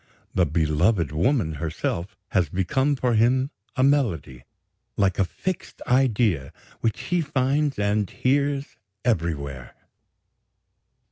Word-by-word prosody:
The 90 -3 +3
beloved 80 +3 +2
woman 90 - +1
herself 85 +4 -3
has 90 -3 +1
become 130 +10 +1
for 125 -2 0
him 130 +5 +3 0.2
a 130 - +2
melody, 100 - +1 0.5
like 95 -2 +2
a - - +5
fixed 180 - -5
idea 115 - +2 0.3
which 115 -2 -1
he 175 -1 0
finds 140 0 0
and 105 -1 +1
hears 140 +1 0 0.3
everywhere. 70 - -2
105 Hz, 110 wpm, -24 LUFS, 85-135 Hz, 0.5 s, a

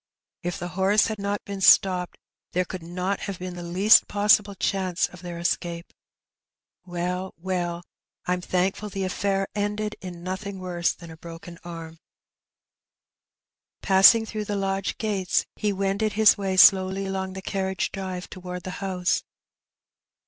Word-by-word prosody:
If 175 0 -3
the 175 - -5
horse 190 +4 +3
had 220 -1 -3
not 200 +1 -3
been 200 -1 -6
stopped 180 -2 +4 0.4
there 180 +1 +1
could 185 0 -7
not 180 +4 -3
have 200 -3 -5
been 180 0 -6
the 175 - -7
least 185 +5 +5
possible 205 0 +3
chance 185 -2 0
of 180 - -14
their 175 -2 -6
escape. 170 0 -2 0.9
Well, 180 +1 -3
well, 175 -1 -3 0.4
I'm 180 0 0
thankful 190 +4 -1
the 195 -1 -3
affair 195 +1 -1
ended 210 +1 -2
in 175 -2 -8
nothing 190 +2 -5
worse 180 -2 -1
than 170 -2 -11
a 160 - -11
broken 170 +1 -10
arm.*' 165 -2 -8 1.8
Passing 200 +4 +7
through 215 -1 -4
the 205 - -3
lodge 195 -2 -2
gates, 200 -5 0
he 210 -1 0
wended 195 +2 -1
his 215 0 +6
way 190 -2 -2
slowly 190 +1 +6
along 190 -1 -3
the 190 - -7
carriage 190 -1 -2
drive 185 -2 -5
towards 180 -1 -7
the 185 - -5
house. 185 -2 0
190 Hz, 150 wpm, -25 LUFS, 180-200 Hz, 1.8 s, Passing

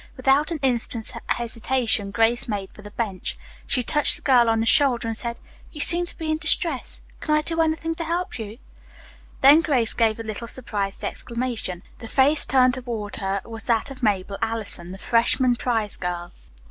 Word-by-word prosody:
Without 270 +3 +3
an 335 - -2
instant's 235 -3 0
hesitation 230 -2 +1
Grace 225 +4 +1
made 200 -4 -4
for - - -14
the 205 - -10
bench. 205 -3 -4 0.3
She 250 - +1
touched 295 +5 +4
the - - -4
girl 245 -4 +4
on 225 0 +2
the 225 - 0
shoulder 245 -2 +3
and 225 - -2
said, 235 +1 -2 0.3
"You 300 - -10
seem 345 +4 +5
to - - -1
be 315 -1 -3
in 310 - -1
distress. 325 -3 0 0.2
Can 305 - +1
I 305 - +3
do 330 +1 0
anything 325 +1 0
to 330 +1 -5
help 340 -3 -3
you?" 220 0 -7 0.8
Then 285 +4 +7
Grace 255 -9 +1
gave 225 -1 +1
a - - -4
little 220 +1 -6
surprised 205 -6 -4
exclamation. 235 -7 -4 0.2
The 225 - -8
face 280 +5 +3
turned 255 -1 +3
toward 235 -5 -5
her 195 0 -2
was 225 -1 -5
that 230 +4 0
of 260 -1 -9
Mabel 200 -3 -1
Allison, 220 -6 -4
the 190 - -8
freshman 245 +3 +2
prize 225 -4 -2
girl. 175 -1 -4
235 Hz, 185 wpm, -23 LUFS, 220-275 Hz, 0.8 s, Then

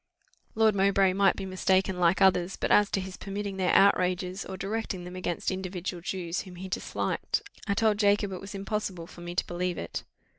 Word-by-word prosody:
Lord 220 -1 +4
Mowbray 195 -1 +3
might 195 0 +4
be 195 - -5
mistaken 190 0 +1
like 180 +2 +4
others; 185 -1 +3
but - - -1
as 205 -1 +5
to - - 0
his 190 -1 -6
permitting 200 0 -4
their 185 -1 +2
outrages, 185 -1 +3
or 190 - -7
directing 195 -1 -3
them 180 +1 -8
against 185 +2 -2
individual 185 -1 -4
Jews 175 -1 -3
whom 185 -2 -11
he 185 +2 -7
disliked, 310 - -2 0.2
I 200 - +1
told 215 -1 +2
Jacob 205 -1 +3
it 185 - -6
was 200 +1 -8
impossible 195 -3 -3
for 175 - -13
me 175 0 -6
to - - +1
believe 175 0 -2
it. 85 - -5
190 Hz, 195 wpm, -28 LUFS, 180-200 Hz, 0.2 s, as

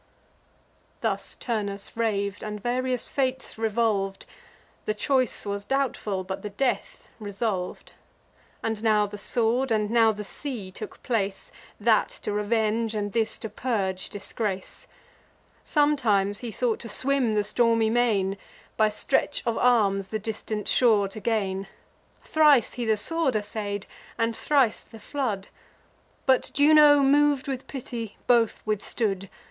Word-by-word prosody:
Thus - - -2
Turnus 205 -4 -4
rav'd, 205 -3 -1
and 210 -1 -5
various 250 +2 -1
fates 260 -1 -1
revolv'd: 215 -3 0 0.6
The 215 - -1
choice 255 +1 +1
was 200 0 -3
doubtful, 220 -6 -1
but 190 +1 -5
the 210 - -5
death 275 - -2
resolv'd. 205 -3 -3 0.7
And 220 -1 -2
now 215 -2 +3
the 205 0 -8
sword, 240 +4 +2
and 215 -1 +1
now 225 -1 +5
the 210 -1 -6
sea 215 -3 -6
took - - -9
place, 200 -5 -2 0.3
That 220 0 +3
to - - -2
revenge, 220 +1 0
and 205 -1 -2
this 225 -1 0
to - - -3
purge 200 -5 -2
disgrace. 200 -1 -5 0.8
Sometimes 230 -10 +2
he 240 -2 -5
thought 235 +1 0
to 230 - -7
swim 255 -1 +1
the 210 - +2
stormy 230 0 +2
main, 205 -5 +1 0.4
By 215 -1 +4
stretch 265 +7 0
of 230 -1 0
arms 200 -6 +3
the 215 - -2
distant 215 0 -4
shore 220 -5 +4
to 205 - -8
gain. 195 -3 -1 0.6
Thrice 300 -6 +4
he 245 - -3
the 220 -1 +2
sword 320 +1 +2
assay'd, 205 -1 -3 0.3
and 230 -1 0
thrice 270 -5 +2
the 225 - -14
flood; 215 -5 -3 0.8
But 260 -1 +3
Juno, 290 -1 +7
mov'd 285 0 +3
with 265 -1 -4
pity, 235 -5 -6
both 235 -3 +3
withstood. 200 -2 -1
220 Hz, 135 wpm, -26 LUFS, 205-250 Hz, 0.8 s, Juno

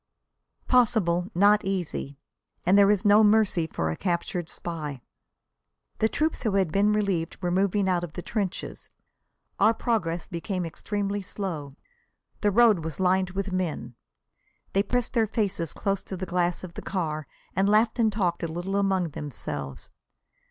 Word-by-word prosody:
Possible, 200 -8 +3
not 205 +3 +5
easy. 175 -7 -3 0.5
And 185 +3 +5
there 200 0 +6
is 205 0 +2
no 205 +1 +7
mercy 210 -6 +3
for 80 - -2
a - - -3
captured 175 -1 -2
spy. 150 -7 -5 1.0
The 220 - +3
troops 310 +6 -1
who 220 -5 0
had 190 -5 +2
been 200 +4 +3
relieved 195 -6 -1
were 175 -2 -1
moving 195 +2 +2
out 180 -2 +1
of 165 -3 -6
the 175 - -6
trenches. 200 -5 -4 0.7
Our 225 - +5
progress 175 -9 -1
became 180 +1 -3
extremely 200 +4 -3
slow. 165 -8 -5 0.6
The 210 - +2
road 215 -4 +5
was 160 0 -5
lined 185 0 +2
with 195 0 -2
men. 170 -9 -2 0.8
They 195 - +4
pressed 245 +4 -1
their 225 -3 +2
faces 195 -7 -1
close 195 -1 -2
to 190 - -6
the 185 - -4
glass 175 0 0
of 180 -2 -8
the - - -7
car 155 -6 -3 0.3
and 195 +2 +2
laughed 220 +3 +3
and 220 -2 +4
talked 180 -5 0
a 170 - -1
little 175 +4 -3
among 190 -3 +1
themselves. 75 - -6
190 Hz, 160 wpm, -26 LUFS, 170-205 Hz, 1.0 s, no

